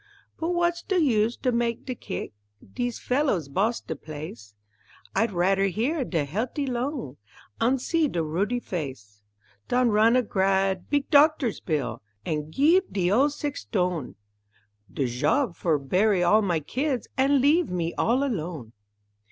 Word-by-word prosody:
But 325 - -1
w'at's 345 0 +1
de 380 - -1
use 230 -6 +2
to 255 - +2
mak' 235 -1 -1
de 255 - -3
kick, 105 - -6 0.4
Dees 245 -1 -2
fellows 250 - 0
boss 210 +11 0
de - - -5
place; 145 -10 -9 0.6
I'd 225 -1 +2
radder 195 +2 +2
hear 250 - -1
de 165 -10 -1
healt'y 235 - -2
lung 245 - -3 0.4
An' 250 +4 +3
see 315 +5 +1
de 170 - -2
ruddy 195 +10 -1
face 130 - -6 0.5
Dan 250 -1 +2
run 220 +2 +4
a 255 - +3
gr'ad 190 -2 0
big 285 -1 +1
doctor's 290 -5 +4
bill, 135 -7 -2 0.2
An' 150 -1 -2
geeve 330 - +3
de 185 -2 0
ol' 265 +8 +4
sex_tone_ 185 - -3 0.8
De 135 - -1
job, 150 - 0
for 165 -3 +1
bury 185 +7 +2
all 210 +5 +5
my 175 -5 +1
kids, 255 - -2
An' 275 +1 +3
leave 305 +6 +3
me 170 -2 -2
all 250 +4 +1
alone. 160 - -4
215 Hz, 150 wpm, -26 LUFS, 165-270 Hz, 0.8 s, all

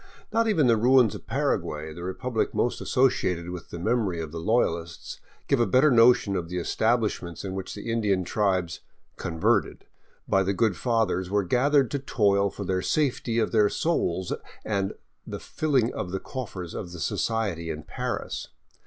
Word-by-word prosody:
Not 230 0 +3
even 175 -10 +3
the 115 -2 +4
ruins 125 -1 +5
of - - -10
Paraguay, 75 +1 -1
the 85 - -9
republic 110 +6 -2
most 120 - 0
associated 90 -10 +1
with 90 -1 -8
the - - -7
memory 105 -2 0
of 80 -2 -5
the 80 - -5
LoyaHsts, 85 -5 -1 0.3
give 140 - +2
a 120 - +3
better 130 +9 +4
notion 115 -4 +5
of 85 -2 -3
the 90 - -5
estabHshments 105 -2 0
in 95 - -4
which 95 -1 -5
the 105 +2 -5
Indian 105 -5 +1
tribes 95 -4 0 0.2
" - - -42
converted 80 -1 0 0.2
" - - -37
by 95 - +3
the 95 +1 0
good 110 -2 +2
Fathers 110 -7 0
were 100 0 +1
gathered 135 +6 +2
to 140 - -1
toil 100 -6 +2
for 100 - -7
the 95 -1 -1
safety 130 -5 0
of 110 -2 +1
their 105 -2 +4
souls 95 - -1 0.3
and 100 -2 -1 0.3
the - - -5
filling 135 -7 0
of 90 - -4
the 95 +1 -3
coffers 95 -10 -6
of 90 -2 -6
the 90 - -8
society 95 -2 -1
in 80 -1 -5
Paris. - - -4
100 Hz, 180 wpm, -26 LUFS, 90-120 Hz, 0.3 s, ruins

